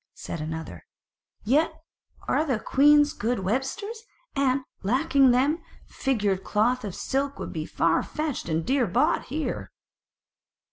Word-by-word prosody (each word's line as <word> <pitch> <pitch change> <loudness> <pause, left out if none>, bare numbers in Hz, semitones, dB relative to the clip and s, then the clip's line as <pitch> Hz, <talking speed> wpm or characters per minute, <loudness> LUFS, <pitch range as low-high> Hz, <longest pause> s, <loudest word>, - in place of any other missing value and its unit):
Said 165 - -6
another; 160 - -6 0.6
"Yet 285 +9 +3 0.6
are - - +2
the 260 -8 0
queens 290 +4 +5
good 235 -1 -1
websters, 270 - -2 0.3
and, 275 -1 +2 0.2
lacking 270 +5 +3
them, 275 +7 +2 0.2
figured 205 -8 -1
cloth 240 +4 +1
of 200 -4 -5
silk 275 +1 -2
would - - -6
be - - -4
far - - +2
fetched 305 - -4
and 160 0 0
dear 260 -2 +2
bought 275 - +2
here." 305 +4 -3
260 Hz, 130 wpm, -26 LUFS, 210-290 Hz, 0.6 s, queens